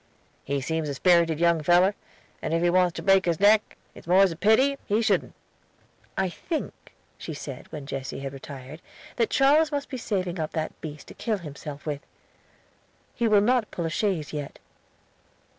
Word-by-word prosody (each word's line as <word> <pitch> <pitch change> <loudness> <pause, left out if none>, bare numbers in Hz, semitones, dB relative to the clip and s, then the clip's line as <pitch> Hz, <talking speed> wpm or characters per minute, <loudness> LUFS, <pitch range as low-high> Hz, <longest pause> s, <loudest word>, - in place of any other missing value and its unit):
"He 140 0 -2
seems 160 +2 -2
a 140 - -3
sperrited 170 0 +3
young 170 -1 +3
feller, 175 +5 +4 0.5
and 165 - -1
if 165 - +1
he 175 - +3
wants 180 -1 +3
to - - -6
break 195 -1 +4
his 170 -2 0
neck 210 +2 +4 0.2
it's - - -14
most 185 +1 +5
a - - -5
pity 240 - +3
he 210 +2 +2
shouldn't." 230 - +1 0.8
"I 190 - +1
think," 310 - -6 0.3
she 160 - -6
said 140 -3 -8
when 150 -3 -7
Jesse 135 -1 -5
had 135 0 -5
retired, 135 +2 -9 0.4
"that 230 -2 +2
Charles 300 +3 +4
must 285 -1 -3
be 260 - -4
saving 185 -6 -2
up 155 - -3
that 160 -1 -4
beast 150 -2 -8
to - - -10
kill 220 -3 -2
himself 150 -3 -9
with. 145 -2 -3 1.1
He 235 - 0
will 210 -2 +5
not 240 0 +2
pull 170 - -4
a 165 - -2
chaise 180 -6 -1
yet." 145 -2 -5
175 Hz, 180 wpm, -26 LUFS, 150-210 Hz, 1.1 s, most